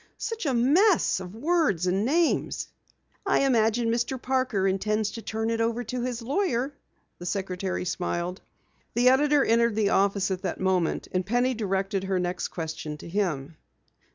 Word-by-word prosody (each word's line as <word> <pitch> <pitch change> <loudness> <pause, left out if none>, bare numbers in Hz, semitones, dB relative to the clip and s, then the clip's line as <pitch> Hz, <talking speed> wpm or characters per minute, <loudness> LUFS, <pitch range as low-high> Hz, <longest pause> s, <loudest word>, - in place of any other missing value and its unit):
"Such 455 -8 -3
a 270 - +1
mess 315 - +4
of 185 +1 -8
words 285 - +1
and 190 +3 +1
names!" 320 +7 +1 0.5
"I - - +2
imagine 230 -3 +2
Mr. 240 +3 -1
Parker 255 -7 0
intends 210 +3 0
to 230 - -7
turn 220 +1 -2
it 230 0 0
over 230 +1 0
to 245 +2 -4
his 245 -1 -3
lawyer," 275 - 0 0.5
the 175 - -8
secretary 185 -1 -2
smiled. 175 +1 -3 0.5
The 245 +1 +5
editor 285 +2 +4
entered 230 -1 +3
the 215 -2 +2
office 200 0 +2
at 185 -1 -2
that 185 - -3
moment, 185 -3 0
and 185 0 0
Penny 245 +6 +1
directed 195 -3 -1
her 190 -1 0
next 180 0 -2
question 160 -2 -5
to - - -10
him. 165 -5 -2
220 Hz, 160 wpm, -26 LUFS, 185-250 Hz, 0.5 s, The